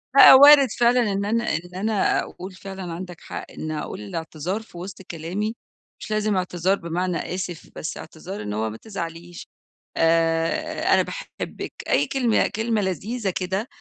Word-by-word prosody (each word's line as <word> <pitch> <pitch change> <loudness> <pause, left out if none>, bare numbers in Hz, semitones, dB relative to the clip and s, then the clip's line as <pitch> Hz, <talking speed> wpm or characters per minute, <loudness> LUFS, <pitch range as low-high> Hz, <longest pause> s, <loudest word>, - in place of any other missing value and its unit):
لأ - - +11
وارد 280 +1 +9
فعلًا 240 -2 +4
إن 200 +1 -1
أنا 230 -2 0
إن 175 +2 -6
أنا 205 +2 +1
أقول 185 +2 -7
فعلًا 190 -2 -7
عندك 175 0 -8
حق - - -7
إن 155 - -5
أقول 150 -7 -5
الاعتذار 160 - -4
في 220 -5 -14
وِسط 185 +2 -7
كلامي، 185 +6 -4 0.4
مش - - -8
لازم 215 -1 +1
اعتذار 180 +1 +1
بمعنى 175 +1 -2 0.2
آسف، 180 -3 -5
بس 155 - -5
اعتذار 165 +5 -8
إن 105 0 -4
هو 110 +1 -1
ما 110 - -8
تزعليش، 170 - -7 0.5
آآ 165 0 +2
أنا - - +5
باحبك، - - -6 0.2
أي - - +3
كلمة 245 -5 +2
كلمة 220 +1 -1
لذيذة 200 - -2
كده، 190 +4 -2
185 Hz, 155 wpm, -23 LUFS, 165-215 Hz, 0.5 s, لأ